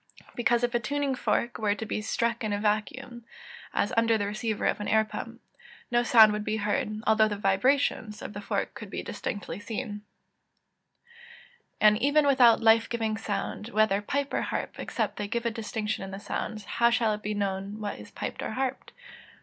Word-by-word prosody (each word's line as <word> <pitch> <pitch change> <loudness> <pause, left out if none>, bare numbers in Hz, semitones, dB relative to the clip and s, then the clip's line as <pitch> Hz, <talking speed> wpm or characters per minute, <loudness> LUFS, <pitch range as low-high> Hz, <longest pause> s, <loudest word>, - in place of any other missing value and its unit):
_ - - -27
Because 240 0 +2
if 245 0 +1
a 240 - +2
tuning 285 +2 -1
fork 240 -1 -1
were 205 -2 +1
to 220 - -5
be 215 - -3
struck 235 +2 -1
in 215 - -1
a 205 - 0
vacuum 235 +4 -2 0.5
(as - - 0
under 230 0 +3
the 205 - -1
receiver 215 +1 -2
of - - +1
an 210 - -4
air 220 0 +3
pump) 215 - -7 0.5
no 240 0 +4
sound 225 -3 +7
would 210 0 -2
be 215 +1 -1
heard, 215 +1 -1
although 220 0 +5
the 205 -1 -3
vibrations 210 +2 +1
of - - -6
the 205 - -6
fork - - -2
could - - -9
be - - -5
distinctly 185 -3 -5
seen. 210 -1 -5 1.0
[Verse: 475 0 -22
"And 210 0 +6
even 285 +2 +4
things 280 - +5
without 240 -4 +5
life 225 0 +5
giving 225 -2 -1
sound, 210 0 -4
whether 215 -3 +2
pipe 280 +6 -2
or - - +1
harp, - - -4
except - - -2
they 205 - -3
give 235 +3 -2
a 235 - +1
distinction 215 -2 -3
in 195 - -6
the 195 0 -7
sounds, 215 +1 -4
how 235 0 +3
shall 235 -2 +2
it 210 - -5
be 210 0 -3
known 200 +1 -3
what 205 -1 -4
is - - -11
piped - - -5
or - - -3
harped." 265 0 -3
220 Hz, 205 wpm, -28 LUFS, 210-240 Hz, 1.0 s, sound